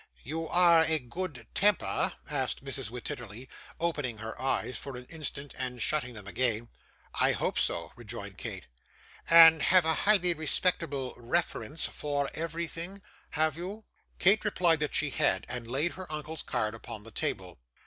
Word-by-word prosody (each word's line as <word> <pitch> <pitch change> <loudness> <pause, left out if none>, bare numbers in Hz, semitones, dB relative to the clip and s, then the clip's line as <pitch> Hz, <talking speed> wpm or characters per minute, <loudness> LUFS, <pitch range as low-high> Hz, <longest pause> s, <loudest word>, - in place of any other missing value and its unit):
'You 160 +5 -4
are 170 -1 +6
a 160 0 +3
good 135 -1 -6
temper?' 205 -1 +2
asked 135 -2 -1
Mrs. 135 -4 -3
Wititterly, 120 0 -6 0.3
opening 145 -8 -1
her 110 +1 -7
eyes 130 -1 0
for 135 -2 -6
an 125 - -9
instant, 145 -3 -4
and 125 -1 -3
shutting 125 0 0
them 105 -2 -9
again. 115 +2 -1 0.5
'I - - +5
hope - - 0
so,' 85 -1 -1
rejoined 105 -4 -8
Kate. - - -6 0.6
'And 165 -1 +9
have 180 +1 +5
a 160 - +3
highly 185 -2 +3
respectable 155 -4 0
reference 155 +4 -1
for 145 -2 -2
everything, 165 +4 -4 0.3
have 155 -2 +2
you?' 200 +5 -6 0.3
Kate 200 +4 +4
replied 175 -6 +3
that 150 -1 -1
she 150 -2 +1
had, 95 -6 +1
and 125 -2 -5
laid 140 +8 0
her 185 -4 -9
uncle's 155 +1 -5
card 110 0 -1
upon 115 -1 -8
the 115 - -11
table. - - -3
145 Hz, 155 wpm, -30 LUFS, 120-165 Hz, 0.6 s, And